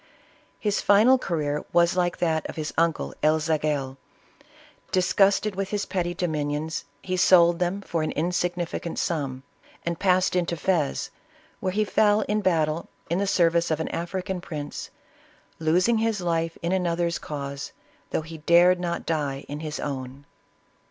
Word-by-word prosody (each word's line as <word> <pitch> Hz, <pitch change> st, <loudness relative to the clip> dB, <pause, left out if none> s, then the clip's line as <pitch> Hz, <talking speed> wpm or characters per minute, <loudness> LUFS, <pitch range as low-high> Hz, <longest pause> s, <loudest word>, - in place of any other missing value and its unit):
His 210 Hz, -1 st, 0 dB
final 225 Hz, +6 st, +5 dB
career 150 Hz, -, -2 dB
was 170 Hz, +1 st, +3 dB
like 175 Hz, -1 st, +1 dB
that 160 Hz, -2 st, 0 dB
of -, -, -7 dB
his 155 Hz, -1 st, -4 dB
uncle 165 Hz, -1 st, +1 dB
El 155 Hz, +1 st, +4 dB
Zagel. 150 Hz, -4 st, -1 dB, 0.9 s
Disgusted 195 Hz, +2 st, +3 dB
with 195 Hz, 0 st, -2 dB
his 205 Hz, -1 st, -1 dB
petty 175 Hz, -2 st, -2 dB
dominions, 155 Hz, -2 st, -2 dB, 0.2 s
he 185 Hz, -, -2 dB
sold 175 Hz, -2 st, +5 dB
them 180 Hz, +3 st, -1 dB
for 170 Hz, -4 st, -2 dB
an 155 Hz, -, -1 dB
insignificant 175 Hz, 0 st, -2 dB
sum, 135 Hz, -6 st, -2 dB, 0.4 s
and 170 Hz, -1 st, -2 dB
passed 185 Hz, -1 st, +2 dB
into 170 Hz, -1 st, 0 dB
Fez, 160 Hz, -4 st, 0 dB, 0.5 s
where 185 Hz, -, -1 dB
he 210 Hz, +3 st, +1 dB
fell 210 Hz, 0 st, +3 dB
in 210 Hz, 0 st, 0 dB
battle 165 Hz, -4 st, 0 dB, 0.2 s
in 175 Hz, -, +1 dB
the 200 Hz, -, 0 dB
service 170 Hz, -2 st, +3 dB
of 155 Hz, -1 st, 0 dB
an 160 Hz, -, -2 dB
African 180 Hz, +2 st, -3 dB
prince, 150 Hz, -5 st, -6 dB, 0.4 s
" -, -, -29 dB, 0.3 s
losing 180 Hz, +8 st, +3 dB
his 225 Hz, -2 st, 0 dB
life 165 Hz, -2 st, -1 dB
in 170 Hz, -, 0 dB
another's 170 Hz, -2 st, 0 dB
cause, 140 Hz, -2 st, -5 dB, 0.4 s
though -, -, -1 dB
he 160 Hz, 0 st, -9 dB
dared 175 Hz, +3 st, +5 dB
not 170 Hz, -1 st, -3 dB
die 145 Hz, -4 st, -2 dB
in 145 Hz, +1 st, -5 dB
his 155 Hz, -1 st, -5 dB
own." 135 Hz, 0 st, -5 dB
170 Hz, 155 wpm, -25 LUFS, 155-185 Hz, 0.9 s, final